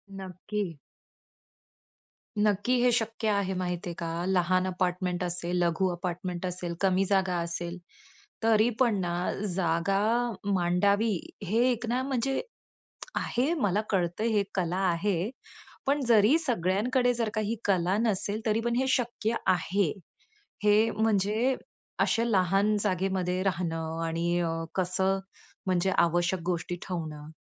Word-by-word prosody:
नक्की. 190 -1 -5 1.7
नक्की 205 +4 +2
हे 250 0 +4
शक्य 225 -1 -1
आहे. 200 -2 +1
माहित 180 -1 -3
आहे 175 - -3
का, 170 +1 -3
लहान 185 0 +2
अपार्टमेंट 180 0 -1
असेल, 175 0 -2
लघु 170 +3 +1
अपार्टमेंट 175 +1 -4
असेल, 180 -1 -3
कमी 195 0 +3
जागा 190 -2 +2
असेल, 170 +1 -4 0.7
तरी 225 0 +4
पण 235 -5 +3
ना, 175 -1 -1 0.4
जागा 175 +2 +1 0.5
मांडावी 200 +5 +2 0.3
हे 205 +4 0
एक 240 0 -2
ना, 250 +2 +1
म्हणजे 270 0 0 0.8
आहे. 265 +7 0
मला 210 - +1
कळतं, 180 +1 0
हे 220 -3 +2
कला 180 -1 0
आहे, 180 +2 0 0.6
पण 280 +1 +2
जरी 225 +5 +6
सगळ्यांकडे 245 - +1
जर 230 -2 -1
काही 215 -1 -1
ही 230 - 0
कला 185 -1 +2
नसेल, 215 -1 -1
तरी 220 0 +2
पण 235 0 +1
हे 260 +1 +1
शक्य 235 -2 -1 0.2
आहे. 180 -1 0 0.7
हे 210 +2 +5
म्हणजे 220 +4 +1 0.4
अशा 230 - +2
लहान 200 -1 +2
जागेमध्ये 185 -2 0
राहणं 165 -3 -2
आणि 170 +1 0
अ, 165 -1 0 0.2
कसं? 190 +1 +1 0.5
म्हणजे 185 0 +1
आवश्यक 175 +2 +2
गोष्टी 175 0 -2
ठेवणं. 155 -4 -5
190 Hz, 125 wpm, -28 LUFS, 175-220 Hz, 1.7 s, जरी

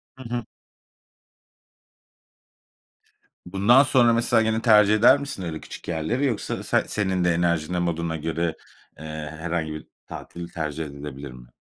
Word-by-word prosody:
Hı 130 - -11
hı. 120 -1 -3 3.0
Bundan 100 +9 +5
sonra, 125 -4 +4
mesela, 115 -1 +3
gene 110 0 0
tercih 105 -2 +5
eder 120 +6 +6
misin 140 -9 -6
öyle 80 -2 -4
küçük - - -11
yerleri, 85 - -1
yoksa 120 -6 -2
sen - - +1
senin 95 -3 -1
de 90 -1 +3
enerjinle, 85 0 0
moduna 85 -1 -1
göre, 80 +1 -2 0.4
eee, 80 - -9 0.3
herhangi 80 -2 -2
bir 75 - -9 0.2
tatil 85 0 -8
tercih 80 -2 -4
edebilir 70 -1 -8
mi? 60 -1 -13
85 Hz, 135 wpm, -24 LUFS, 80-110 Hz, 3.0 s, eder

